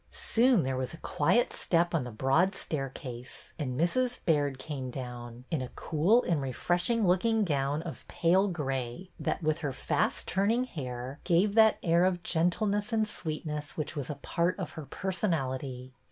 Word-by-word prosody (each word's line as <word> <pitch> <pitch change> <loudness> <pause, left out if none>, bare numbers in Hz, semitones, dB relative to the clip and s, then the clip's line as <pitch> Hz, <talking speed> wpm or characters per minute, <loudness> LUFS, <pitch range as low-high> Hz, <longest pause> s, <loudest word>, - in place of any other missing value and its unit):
Soon 235 -4 +3
there 130 0 -1
was 130 +5 -3
a - - -13
quiet 185 +11 +2
step 175 0 +1
on 155 -6 +1
the 125 - -6
broad 135 - +2
stair 135 -4 -3
case, 125 -3 -9
and 130 -3 -2
Mrs. 245 +9 +1
Baird 145 -5 +2
came 130 -2 -5
down, 125 -1 -7
in 160 -5 0
a 125 - -4
cool 180 +11 +3
and 165 -5 +1
refreshing 175 - 0
looking 215 +5 +3
gown 145 -1 0
of 170 - -8
pale 185 +4 +3
gray 135 -1 -3
that, - - -2
with 155 +1 +1
her 145 -4 -2
fast - - 0
turning 210 +6 +2
hair, 130 - -6
gave 185 +4 +3
that 220 -1 +6
air 170 +1 +4
of 180 -2 0
gentleness 200 +5 +1
and 220 -1 +2
sweetness 155 -5 -5
which 155 +1 -3
was 145 -2 -4
a 150 - -3
part 170 +5 -1
of - - -4
her 155 -4 -8
person 190 0 -1
ality. 130 -3 -3
160 Hz, 175 wpm, -30 LUFS, 135-185 Hz, -, that